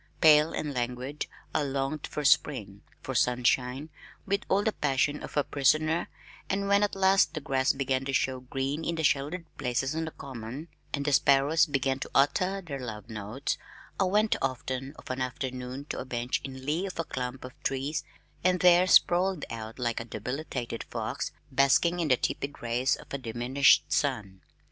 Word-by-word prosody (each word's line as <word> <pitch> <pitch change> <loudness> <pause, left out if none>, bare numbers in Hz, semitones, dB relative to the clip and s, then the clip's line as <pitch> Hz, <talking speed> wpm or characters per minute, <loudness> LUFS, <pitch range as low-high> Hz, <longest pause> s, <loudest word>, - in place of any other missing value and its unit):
Pale 155 0 +6
and 150 -2 -3
languid 125 +3 -3 0.3
I - - +2
longed 140 +1 -2
for 150 - -4
spring, 105 -9 +2 0.2
for 135 - -4
sunshine, 125 +4 +1 0.3
with 200 +1 0
all 200 +2 +3
the 220 - +2
passion 145 -2 0
of - - -7
a 145 - +4
prisoner, 155 +5 +2 0.4
and 200 +1 0
when 200 0 +4
at 205 -1 +1
last 190 -3 +4
the - - -1
grass 135 -2 +1
began 135 -1 -1
to 135 - -2
show 130 -1 +1
green 135 +4 -3
in 170 - -1
the 160 - -2
sheltered 150 +5 +1
places 135 +4 -1
on 160 0 -1
the - - -4
Common 135 +2 -8 0.2
and 140 -1 -2
the 145 - +1
sparrows 140 +4 +4
began 135 -2 0
to - - -5
utter 185 +8 +2
their 140 -5 -5
love 115 -2 -7
notes, 110 +6 -3 0.4
I 195 - +4
went 210 +3 +2
often 130 +1 -3
of - - -8
an 130 0 -3
afternoon 130 +1 -4
to - - -3
a - - -5
bench 120 -1 -2
in 130 -1 -8
lee 165 +7 0
of 185 - -8
a 165 - 0
clump 130 -3 -5
of 130 - -8
trees 135 +3 -1 0.4
and 180 0 +3
there 180 0 +6
sprawled 185 -1 +4
out 110 -1 -6
like 120 -2 -1
a 115 - -5
debilitated 120 +1 -4
fox, 115 +3 -4 0.2
basking 140 +6 +3
in 165 - +1
the 130 -3 +4
tepid 140 +3 -3
rays 120 +3 +1
of - - -13
a 140 - -2
diminished 125 +3 +3
sun. 95 -3 -1
135 Hz, 180 wpm, -28 LUFS, 125-155 Hz, 0.4 s, Pale